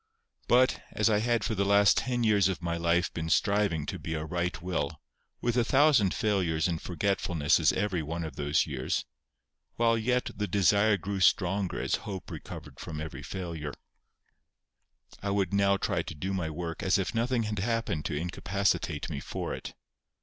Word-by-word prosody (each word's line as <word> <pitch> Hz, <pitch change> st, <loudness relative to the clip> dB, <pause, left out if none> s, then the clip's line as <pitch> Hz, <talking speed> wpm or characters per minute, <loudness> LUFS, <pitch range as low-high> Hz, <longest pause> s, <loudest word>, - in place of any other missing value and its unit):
But, 125 Hz, +1 st, +4 dB
as 105 Hz, +1 st, +2 dB
I 105 Hz, -, +3 dB
had 120 Hz, 0 st, +1 dB
for 115 Hz, -, -1 dB
the 100 Hz, -2 st, +1 dB
last 100 Hz, 0 st, +5 dB
ten 125 Hz, -2 st, 0 dB
years 105 Hz, -4 st, +4 dB
of 95 Hz, -2 st, -2 dB
my 85 Hz, 0 st, -1 dB
life 85 Hz, +1 st, +1 dB
been 80 Hz, -1 st, -3 dB
striving 100 Hz, -6 st, +2 dB
to -, -, -5 dB
be 80 Hz, -, -4 dB
a 80 Hz, 0 st, -3 dB
right 90 Hz, +2 st, -2 dB
will, 80 Hz, -4 st, -3 dB, 0.4 s
with 120 Hz, -1 st, 0 dB
a 120 Hz, -, +3 dB
thousand 135 Hz, -6 st, +4 dB
failures 90 Hz, -7 st, +1 dB
and 85 Hz, -2 st, -2 dB
forgetfulnesses 90 Hz, -4 st, +1 dB
every 95 Hz, -2 st, 0 dB
one 80 Hz, +2 st, -4 dB
of 80 Hz, -4 st, -6 dB
those 75 Hz, +1 st, +1 dB
years, 65 Hz, -4 st, -2 dB, 0.7 s
while 115 Hz, -1 st, +3 dB
yet 125 Hz, +3 st, 0 dB
the 105 Hz, +1 st, -2 dB
desire 100 Hz, +2 st, +3 dB
grew 100 Hz, +2 st, -4 dB
stronger 95 Hz, 0 st, +2 dB
as -, -, 0 dB
hope 95 Hz, -3 st, -6 dB
recovered -, -, -9 dB
from 75 Hz, -, -6 dB
every 80 Hz, +1 st, -6 dB
failure, 85 Hz, -6 st, -5 dB, 1.5 s
I 100 Hz, -, -2 dB
would 100 Hz, -1 st, 0 dB
now 100 Hz, 0 st, +3 dB
try -, -, 0 dB
to -, -, -7 dB
do 95 Hz, +6 st, -3 dB
my 90 Hz, -4 st, -1 dB
work 80 Hz, +1 st, -5 dB
as 95 Hz, -, +3 dB
if 95 Hz, -, -2 dB
nothing 120 Hz, +1 st, +1 dB
had 105 Hz, -2 st, -3 dB
happened 115 Hz, -7 st, -1 dB
to -, -, -2 dB
incapacitate 90 Hz, -1 st, -1 dB
me -, -, -4 dB
for -, -, -4 dB
it. -, -, -7 dB
95 Hz, 180 wpm, -29 LUFS, 85-105 Hz, 1.5 s, last